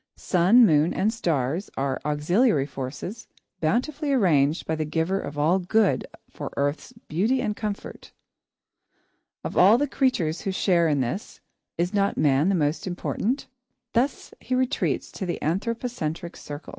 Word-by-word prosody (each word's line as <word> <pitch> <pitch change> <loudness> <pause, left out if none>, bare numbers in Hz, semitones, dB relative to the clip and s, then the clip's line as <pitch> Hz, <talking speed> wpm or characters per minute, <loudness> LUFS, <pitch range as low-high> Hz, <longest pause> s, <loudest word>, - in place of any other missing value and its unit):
Sun, 195 +7 +5
moon, 155 -2 +3
and 210 +4 +1
stars 165 - -1
are 135 0 -1
auxiliary 150 - +2
forces, 145 - -6 0.3
bountifully 270 - 0
arranged 165 - +2
by 160 - -1
the 155 0 -1
Giver 160 +5 -1
of 145 -4 -6
all 160 +6 +3
Good 190 -7 +1 0.2
for - - -7
Earth's 145 - -1 0.2
beauty 215 +12 +1
and 210 -3 -1
comfort. 210 -1 -6 1.3
Of - - -5
all 200 +6 +7
the 290 - +1
creatures 255 - 0
who 195 - -2
share 175 -3 +2
in 145 -3 +1
this, 130 - -4 0.4
is 175 +4 -1
not 200 -1 +1
man 145 +3 +3
the 195 - +2
most 155 +2 0
important? 210 +8 -2 0.5
Thus 260 +4 -1
he 255 - -2
retreats 255 0 0
to 190 - -5
the 175 - -2
anthropocentric 185 -3 -3
circle. 145 +1 -9
180 Hz, 145 wpm, -25 LUFS, 150-220 Hz, 1.3 s, all